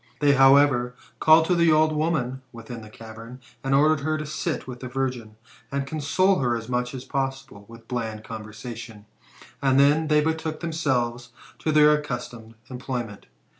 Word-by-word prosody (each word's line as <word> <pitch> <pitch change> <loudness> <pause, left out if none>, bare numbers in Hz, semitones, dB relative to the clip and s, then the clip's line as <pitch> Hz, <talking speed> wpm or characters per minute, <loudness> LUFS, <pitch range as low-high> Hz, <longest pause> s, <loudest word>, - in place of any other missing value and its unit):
They, 145 -1 +4
however, 135 -2 +4 0.2
caUed 160 +1 +6
to 180 - +1
the 170 -2 +4
old 155 0 +4
woman 150 -5 -1
within 115 0 -9
the 110 - -12
cavern, 115 +3 -11 0.2
and 135 0 +1
ordered 155 +2 +4
her 155 +2 -1
to 155 - -5
sit 155 +2 -3
with 125 -1 -8
the 130 - -7
virgin, 125 -4 -4 0.4
and 140 0 -2
console 155 +6 +1
her 120 -3 +1
as 115 -1 -8
much 125 +1 -2
as 130 - -7
possible 135 -6 -4
with 115 0 -14
bland 110 -3 -4
conversation; 110 0 -9 0.6
and 135 -1 +3
then 150 +3 +4
they 150 0 +4
betook 160 0 -2
themselves 125 -8 -2 0.3
to 155 - -1
their 150 0 +6
accustomed 125 -6 -5 0.2
employment. 125 -4 -5
135 Hz, 165 wpm, -24 LUFS, 120-150 Hz, 0.6 s, caUed